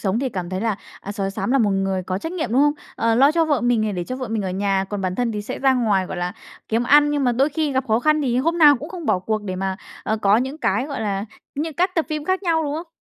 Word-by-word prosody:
sống 195 +2 0
thì 265 +1 -1
cảm 185 -5 -5
thấy 185 +1 -2
là, 225 -3 0 0.2
à, 200 - -6
sói 195 -1 -2
xám 195 - -3
là 275 - +4
một 215 -5 +3
người 195 -1 0
có 185 +1 -3
trách 325 - -5
nhiệm, 320 -10 -3
đúng 265 - +4
không? 295 0 +4 0.2
Ờ, 230 0 +2
lo 275 +5 +5
cho 330 0 +3
vợ 290 -4 +1
mình 245 -2 +2
này 215 -1 0
để 180 -2 -3
cho 255 +7 -5
vợ 255 -3 -5
mình 220 -2 -1
ở 190 - -2
nhà, 195 0 0
còn 205 -1 -3
bản 185 -1 -2
thân 240 0 -1
thì 210 -1 -3
sẽ - - -5
ra 265 -1 +3
ngoài, 205 -6 +1
gọi 190 - -6
là, 175 0 -2 0.4
kiếm 225 +2 +1
ăn, 295 +3 +5
nhưng 290 -2 0
mà 245 - +3
đôi 270 +5 +2
khi 310 -1 -1
gặp 265 0 0
khó 220 +1 +3
khăn 305 +2 +2
thì 245 -3 0
hôm 330 +5 0
nào 295 -3 +7
cũng 295 +6 -8
không 340 -3 -7
bỏ - - +2
cuộc 215 +3 -2
để 185 -2 -4
mà, 190 0 -2 0.3
ờ, 220 - -1
có 205 -1 +3
những 265 +6 -2
cái 265 -3 0
gọi 280 -4 -5
là 200 -2 -2 0.3
những 305 +1 -3
các 360 +1 +1
tập 330 -3 +1
phim 305 -2 -3
khác 375 +3 0
nhau, 330 -3 +1
đúng 290 -1 -2
không? 330 +1 -6
240 Hz, 315 wpm, -22 LUFS, 200-295 Hz, 0.4 s, nào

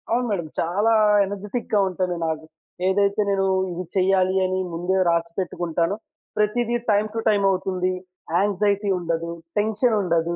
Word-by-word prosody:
అవును, 245 +2 +1
మేడమ్. 175 -6 -2
చాలా 205 +7 +2 0.3
ఎనర్జిటిక్‌గా 205 +3 -2
ఉంటాను 180 -1 -2
నాకు. 160 0 -3 0.4
ఏదైతే 200 +2 +2
నేను 195 -1 +1 0.3
ఇది 175 +1 -4
చేయాలి 185 0 +3
అని 185 0 -1
ముందే 180 +3 0
రాసిపెట్టుకుంటానో 170 +1 -1 0.4
ప్రతీది 235 +3 +1 0.2
టైమ్ 210 +1 +2
టు - - 0
టైమ్ 205 -2 +2
అవుతుంది. 185 -1 0 0.4
యాంక్సైటీ 200 +1 +1
ఉండదు. 170 -1 -2 0.3
టెన్షన్ 220 +2 +1
ఉండదు. 170 -2 0
190 Hz, 130 wpm, -23 LUFS, 175-205 Hz, 0.4 s, చేయాలి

